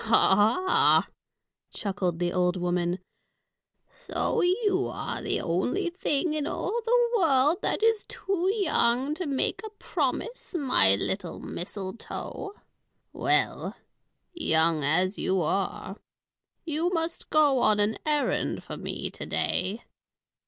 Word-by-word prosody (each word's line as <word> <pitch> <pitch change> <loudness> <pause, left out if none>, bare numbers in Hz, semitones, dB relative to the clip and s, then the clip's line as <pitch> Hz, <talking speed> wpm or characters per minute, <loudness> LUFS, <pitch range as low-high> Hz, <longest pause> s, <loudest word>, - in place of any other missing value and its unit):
"Ho, 225 +1 +3 0.5
ho!" 375 - +5 0.7
chuckled 190 -4 -2
the 175 0 -1
old 180 0 +1
woman. 175 0 0 1.0
"So - - -1
you 380 +1 +2
are - - -4
the - - -1
only 250 - -1
thing 340 -3 0
in 305 -1 -1
all 390 +5 -2
the 480 +1 +3
world 300 -2 +3
that - - -1
is 450 -2 +3
too 380 -1 -1
young 275 - +1
to 345 +1 -4
make 275 -2 -1
a 435 - -5
promise, 435 +1 -3
my 255 - +4
little 175 - -3
mistletoe. 195 - -6 0.6
Well, - - 0 0.6
young 160 - +2
as 180 +7 +1
you 190 0 +1
are, 195 +3 -2 0.7
you 325 +2 0
must 330 -2 -3
go 295 -4 +4
on 215 -3 +3
an 205 +2 +1
errand 300 -1 0
for - - -7
me - - -5
to - - -8
day. 205 +5 -1
270 Hz, 125 wpm, -27 LUFS, -, 1.0 s, ho